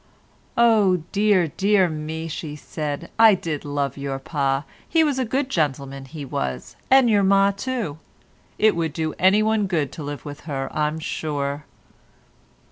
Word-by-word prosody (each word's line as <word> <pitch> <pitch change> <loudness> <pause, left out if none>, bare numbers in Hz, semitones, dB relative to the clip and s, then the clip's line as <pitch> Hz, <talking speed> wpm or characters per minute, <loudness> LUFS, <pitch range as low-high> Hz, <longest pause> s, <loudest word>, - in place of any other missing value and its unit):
"Oh, 210 -7 +4
dear, 205 -3 +3
dear 195 +3 +3
me," 160 0 -5
she 155 -1 -5
said, 150 -1 -5
"I 225 -2 +8
did 160 -5 -4
love 145 -2 -2
your 140 -1 -3
pa; 135 0 -1 0.3
he 325 -1 +4
was 285 -4 0
a 260 - +1
good 260 +4 -1
gentleman, 140 - -2
he 145 +2 -8
was, 65 - -4
and 265 -1 +6
your 210 -3 +4
ma 195 +1 +4
too; 200 - -4 0.6
it 215 -3 +4
would 165 -3 -1
do 160 -1 -2
anyone 210 +2 +3
good 155 -7 -1
to 155 - -8
live 145 -2 -6
with 145 0 -7
her, 135 -2 -3
I'm 150 +1 0
sure." 145 -2 -3
160 Hz, 155 wpm, -23 LUFS, 145-205 Hz, 0.6 s, I